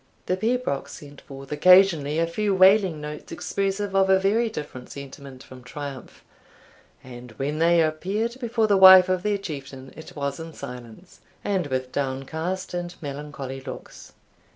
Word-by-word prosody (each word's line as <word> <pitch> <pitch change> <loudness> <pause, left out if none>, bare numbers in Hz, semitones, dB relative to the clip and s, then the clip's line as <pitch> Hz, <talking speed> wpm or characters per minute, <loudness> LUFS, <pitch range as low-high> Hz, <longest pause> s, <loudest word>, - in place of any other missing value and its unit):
The 185 - 0
pibroch 225 - -2
sent 145 -1 -12
forth 135 0 -12
occasionally 160 -2 +4
a 165 - +2
few 200 +4 -1
wailing 190 -3 +4
notes 150 0 -8
expressive 195 0 -3
of 190 0 +3
a 190 - +6
very 220 +4 +1
different 145 - -8
sentiment 140 -1 -10
from 130 -1 -14
triumph; 140 +1 -9 0.8
and 125 -1 -11
when 140 +6 -3
they 170 +1 +4
appeared 200 +10 -2
before 230 -2 0
the 205 -2 +3
wife 190 -1 +9
of 185 -1 0
their 205 +1 0
Chieftain, 140 -7 -8
it 160 - -12
was 140 -1 -3
in 165 0 -8
silence, 125 +5 -11 0.2
and 190 -6 -1
with 130 -1 -3
downcast 160 +8 -4
and 175 0 -5
melancholy 140 -2 -7
looks. 130 -1 -10
160 Hz, 155 wpm, -24 LUFS, 140-190 Hz, 0.8 s, wife